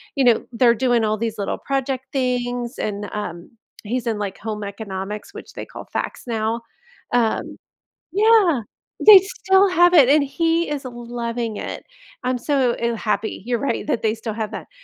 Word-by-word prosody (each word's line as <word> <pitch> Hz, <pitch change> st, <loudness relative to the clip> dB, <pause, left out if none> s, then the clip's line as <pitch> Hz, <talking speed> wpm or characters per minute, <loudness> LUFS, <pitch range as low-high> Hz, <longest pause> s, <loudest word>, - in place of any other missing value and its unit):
you 275 Hz, -, +2 dB
know, 240 Hz, -2 st, +4 dB
they're 235 Hz, 0 st, +5 dB
doing 240 Hz, -1 st, +2 dB
all 215 Hz, 0 st, +1 dB
these 225 Hz, 0 st, -3 dB
little 200 Hz, -, -3 dB
project 270 Hz, -1 st, -2 dB
things 245 Hz, -1 st, -2 dB
and, 205 Hz, -1 st, -3 dB
um, 175 Hz, -5 st, -6 dB, 0.3 s
he's 240 Hz, +3 st, -3 dB
in, 225 Hz, -2 st, 0 dB
like, 200 Hz, -2 st, -3 dB
home 215 Hz, -1 st, -4 dB
economics, 200 Hz, 0 st, -6 dB
which -, -, -10 dB
they -, -, -6 dB
call -, -, -10 dB
FACS -, -, -3 dB
now, 225 Hz, -1 st, -1 dB, 0.5 s
um 235 Hz, -3 st, +1 dB, 0.6 s
Yeah, 410 Hz, -, +4 dB, 0.4 s
they 425 Hz, -2 st, +11 dB
still 385 Hz, 0 st, +2 dB
have 350 Hz, -1 st, +5 dB
it, 285 Hz, -7 st, +7 dB
and 295 Hz, +2 st, +5 dB
he 330 Hz, +4 st, 0 dB
is 285 Hz, -2 st, -3 dB
loving 235 Hz, -2 st, -4 dB
it, -, -, -6 dB, 0.4 s
I'm 255 Hz, 0 st, 0 dB
so, 260 Hz, -1 st, +1 dB
eh, 235 Hz, 0 st, -1 dB
happy 210 Hz, -2 st, -2 dB
you're 240 Hz, -1 st, 0 dB
right 280 Hz, -, -2 dB
that 265 Hz, -, 0 dB
they 220 Hz, -1 st, +1 dB
still 220 Hz, -1 st, -5 dB
have 220 Hz, -2 st, -4 dB
that, -, -, -7 dB
240 Hz, 175 wpm, -21 LUFS, 220-275 Hz, 0.6 s, they